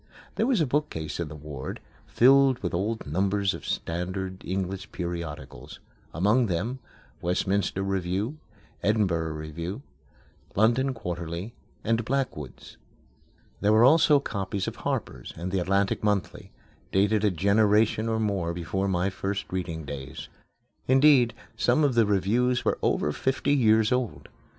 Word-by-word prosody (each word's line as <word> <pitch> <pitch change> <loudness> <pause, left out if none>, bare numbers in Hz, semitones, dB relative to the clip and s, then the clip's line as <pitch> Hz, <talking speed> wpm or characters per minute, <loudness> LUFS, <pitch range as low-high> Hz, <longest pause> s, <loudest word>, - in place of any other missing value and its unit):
There 225 - 0
was 255 -6 +2
a - - +3
bookcase 125 - -2
in 85 - -2
the 75 - -9
ward, 75 -3 -7 0.3
filled 135 +1 +5
with 90 - -2
old 105 +6 -2
numbers 95 +5 0
of - - -8
standard 95 +2 -3
English 95 0 -4
periodicals; 85 -4 -6 0.3
among 105 - +2
them: 110 +9 -2 0.4
Westminster 95 +2 0
Review, 95 - -2 0.4
Edinburgh 90 -7 +1
Review, 85 - -6 0.7
London 120 +6 +2
Quarterly, 90 +1 -5 0.3
and 115 +1 +1
Blackwood's. 105 - -4 0.8
There 105 - +2
were 110 +2 +6
also 150 +1 +6
copies 100 -6 -3
of - - -5
Harper's - - -4
and 90 +3 -4
The 95 - +1
Atlantic 100 +3 0
Monthly, 105 -3 -1 0.4
dated 105 +2 +2
a 105 - +4
generation 105 +4 +2
or 110 0 0
more 95 -6 -1
before 90 +3 -2
my 95 0 0
first 100 +1 -3
reading 85 -4 -4
days. 70 -2 -7 0.6
Indeed, 130 -3 +5 0.2
some 120 +5 +2
of 140 -3 +3
the 115 -3 +3
reviews 115 +6 +1
were - - +1
over 75 - +1
fifty 130 - 0
years 110 -4 +4
old. 125 -3 -2
100 Hz, 135 wpm, -27 LUFS, 90-115 Hz, 0.8 s, were